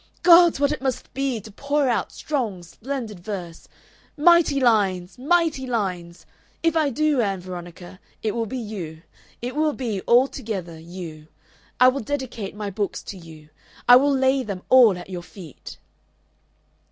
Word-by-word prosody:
Gods! 340 -3 +7
what 285 0 +2
it 300 - -3
must 265 -2 -3
be 270 -3 -1
to 215 - -12
pour 280 +5 0
out 240 - 0
strong, 230 - -3
splendid 225 +1 -6
verse 175 -3 -7 0.5
mighty 325 -2 +5
lines! 205 -5 +1
mighty 310 -2 +1
lines! 180 -7 -3 0.4
If 330 -1 +2
I 310 -3 +2
do, 295 0 +1
Ann 195 -3 -1
Veronica, 175 0 -9 0.2
it 215 -2 0
will 230 -1 -2
be 260 - -5
you. 180 -9 -7 0.4
It 250 +2 -4
will 305 0 +1
be 225 -8 -3
altogether 220 -9 +1
you. 165 -2 -9 0.5
I 255 - +8
will 265 +2 -2
dedicate 235 -6 -5
my 210 -1 -5
books 200 +1 -3
to 195 - -8
you. 160 -2 -14 0.4
I 245 - +10
will 285 +2 +3
lay 265 0 +2
them 200 -6 -6
all 240 -7 +7
at 175 - -9
your 180 -1 -5
feet." 175 -4 -12
225 Hz, 155 wpm, -23 LUFS, 185-275 Hz, 0.5 s, I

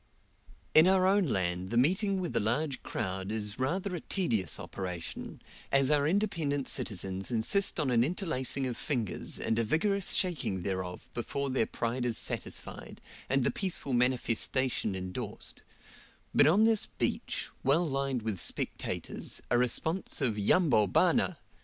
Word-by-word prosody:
In 160 +3 +8
our 190 -1 +4
own 195 0 +4
land 90 -4 -1
the 120 - -1
meeting 190 - +2
with 180 -2 -3
a - - +4
large 130 +6 -1
crowd 95 +1 -3
is 105 0 -3
rather 180 +9 -1
a - - -3
tedious 115 - 0
operation, 90 -3 -6 0.3
as 135 +1 +4
our 145 -1 +3
independent 160 -7 0
citizens 95 -2 -2
insist 125 - +1
on 145 -4 +1
an 120 -1 +4
interlacing 140 -5 -1
of 125 -2 -2
fingers, 120 - -2
and 115 - 0
a - - +3
vigorous 195 - +1
shaking 140 - 0
thereof 95 -2 -3
before 140 +3 -2
their 130 -4 +1
pride 120 +2 -2
is 120 -2 +1
satisfied, - - -4 0.3
and 135 0 +3
the - - +2
peaceful 180 -8 -2
manifestation 125 -2 +1
endorsed; 95 -1 -5 0.7
but - - +6
on 190 +8 +5
this 225 -2 +3
beach, - - -2
well 150 +6 +3
lined 135 -4 -1
with 110 -4 -2
spectators, - - -3
a 120 - +5
response 160 +9 0
of 125 -7 +1
"Yambo, 115 - +4
bana!" 90 - +2
130 Hz, 145 wpm, -30 LUFS, 110-165 Hz, 0.7 s, In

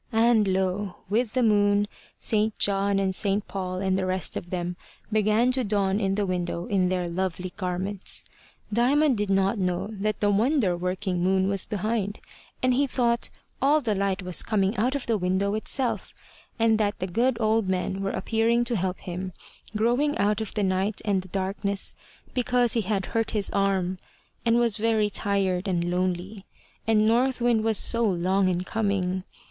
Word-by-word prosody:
And 225 -2 +4
lo! 190 +1 -1 0.2
with 225 +1 +1
the 255 - +3
moon, 205 -1 +3 0.3
St. 215 0 +1
John 200 0 +2
and 195 -1 +1
St. 200 +2 0
Paul, 185 -2 -4
and 190 -1 +1
the 185 - -1
rest 185 -2 -1
of 175 - -5
them, 175 -1 -3 0.4
began 215 +3 +3
to 255 0 0
dawn 200 -2 +1
in 195 -2 0
the 205 0 0
window 175 -2 -2
in 185 -2 +1
their 180 -1 -1
lovely 180 +1 -3
garments. 185 +1 -3 0.5
Diamond 270 +5 +3
did 205 -2 -2
not 195 +2 +2
know 180 +1 -1
that 215 0 -2
the 205 -1 +2
wonder 220 - +2
working 180 +1 -2
moon 190 +1 +2
was 195 -1 0
behind, 210 0 -2 0.4
and 255 0 +4
he 280 +3 +2
thought 240 -2 +1 0.3
all 290 +3 +4
the 235 -7 -1
light 195 -1 -1
was 180 -1 0
coming 200 -1 0
out 250 +6 +1
of 280 - -3
the 225 -3 0
window 190 +2 0
itself, 240 +4 -2 0.4
and 225 -2 +3
that 205 -1 0
the 185 - -3
good 235 +6 0
old 220 -2 +1
men 190 +1 -1
were 195 - -1
appearing 230 +3 +1
to 240 0 -1
help 185 -2 -1
him, 185 +1 -5 0.4
growing 245 +7 +1
out 210 +1 +1
of 220 - -6
the 210 - 0
night 190 +2 0
and 200 -3 +1
the 185 - -12
darkness, 195 +1 -1 0.4
because 245 -1 +2
he 230 - +2
had 200 -1 -1
hurt 225 -1 +1
his 205 - 0
arm, 190 -2 0 0.5
and 230 0 +4
was 235 -3 +2
very 220 -1 +1
tired 195 -2 0
and 175 -2 0
lonely, 185 +2 -2 0.4
and 215 -1 +4
North 250 +4 +2
Wind 235 -2 +2
was 220 -2 +3
so 235 +3 +5
long 190 -1 +2
in 180 -1 0
coming. 190 -3 -1
200 Hz, 180 wpm, -26 LUFS, 185-225 Hz, 0.5 s, so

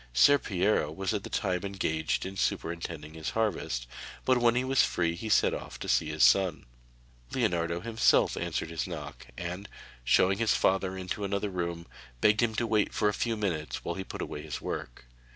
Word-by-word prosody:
Ser 140 - +6
Piero 95 -7 +1
was 95 +6 -2
at 105 - -1
the - - -7
time 90 -2 -1
engaged 80 -6 -1
in 95 +1 -6
superintending 85 -4 -3
his 80 -1 -4
harvest, 85 - -1 0.4
but 130 -1 +4
when 120 0 +4
he 125 - +2
was 135 0 +3
free 85 -1 0
he 110 +6 -5
set - - +4
off - - -6
to - - -7
see - - +2
his - - +1
son. 85 +7 +4 0.7
Leonardo 85 0 0
himself 110 +1 +3
answered 80 - -3
his 80 +1 -2
knock, 75 -4 -7
and, 90 +4 -5 0.3
showing 95 - +3
his 115 -2 +3
father 95 0 +1
into 95 +2 -4
another 100 +1 -1
room, 85 -2 -3 0.3
begged 105 - +4
him 115 -2 +1
to 120 - 0
wait 110 -2 +1
for 105 - +3
a - - -1
few 115 +2 -1
minutes 85 -7 -3
while - - -1
he 95 - -5
put - - -6
away 75 - -6
his - - -5
work. - - -6
95 Hz, 190 wpm, -29 LUFS, 85-105 Hz, 0.7 s, Ser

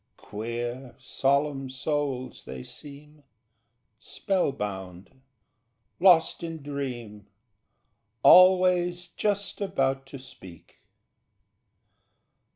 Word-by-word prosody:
Queer, 120 +4 -6
solemn 135 +1 -1
souls 135 -2 -3
they 65 -1 -8
seem, 150 +1 -13 0.8
Spell 190 -7 -1
bound, 95 +2 -7 0.8
lost 175 -3 +4
in 165 -3 -6
dream, 120 -8 -6 1.0
Always 180 -1 +5
just 205 +1 -2
about 135 -8 -1
to 140 - -9
speak... 95 -10 -15
140 Hz, 70 wpm, -26 LUFS, 120-170 Hz, 1.0 s, Always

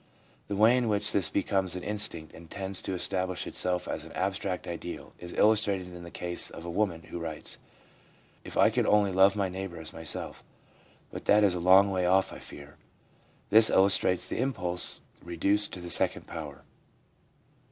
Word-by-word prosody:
The 100 - -3
way 110 +4 +5
in 120 -3 0
which 105 0 +2
this 95 -6 +3
be 100 - -1
comes 95 -3 -1
an 90 - -6
instinct, 100 -7 0
and 85 0 -14
tends 95 -1 -4
to 95 - -4
establish 90 0 -2
itself 90 -1 -2
as 80 - -4
an 80 - -12
abstract 95 0 -3
ideal, 85 0 -7
is 90 0 -8
illustrated 100 -4 +2
in 90 - -10
the 85 - -10
case 85 0 -2
of 85 - -10
a 85 - -5
woman 85 -4 -1
who 85 - -5
writes: 80 -2 -4 0.4
* - - -32
If - - -8
I - - +5
could - - 0
only 105 -2 +3
love 95 +2 +4
my 100 -2 0
neighbour 95 -2 -6
as 80 - -7
myself! 80 -2 -6 0.7
But - - -8
that 105 +1 +4
is 100 -3 +4
a 90 - -3
long 95 +3 +5
way 90 -2 0
off, 95 +1 +2
I - - -9
fear/ 70 0 -12 0.7
This 110 0 +7
illustrates 95 -1 +2
the - - -4
impulse 95 -9 -1 0.2
reduced 100 +5 0
to - - -6
the 85 0 -4
second - - +4
power. 75 -4 -8
95 Hz, 190 wpm, -28 LUFS, 85-100 Hz, 0.7 s, This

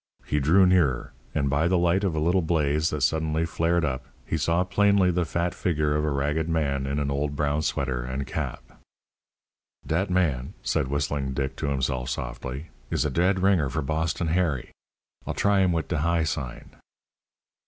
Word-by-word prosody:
He 75 - 0
drew 85 +7 +5
nearer, 70 -8 +2 0.2
and 70 -3 +1
by 70 +4 +2
the 90 +1 +3
light 90 +3 +2
of 95 -5 0
a - - 0
little 85 +4 +2
blaze 80 -1 +1
that 75 - -3
suddenly 80 +3 +1
flared 85 0 +1
up 65 -2 -3 0.2
he - - -2
saw 85 +3 +2
plainly 100 0 +3
the 90 0 0
fat 85 +2 -1
figure 75 -4 0
of 75 - +1
a 75 - +1
ragged 75 +3 0
man 70 -4 0
in 70 +1 -1
an 70 -1 -1
old 70 +1 -1
brown 75 +1 0
sweater 65 -4 -1
and 65 +2 -3
cap. - - -6 1.0
"Dat 90 +5 0
man," 75 -9 0
said - - 0
Whistling 70 -1 -2
Dick 70 -1 -2
to - - -2
himself 65 -2 -1
softly, 70 +6 -5 0.2
"is - - 0
a 75 - 0
dead 90 +5 +2
ringer 90 -8 +3
for 80 +3 -2
Boston 80 +3 -1
Harry. 80 -6 0 0.6
I'll - - -2
try 100 -1 +3
him 95 -2 +3
wit 80 -1 -1
de 85 - -1
high 85 +1 +2
sign." 65 -5 -5
75 Hz, 185 wpm, -26 LUFS, 70-85 Hz, 1.0 s, drew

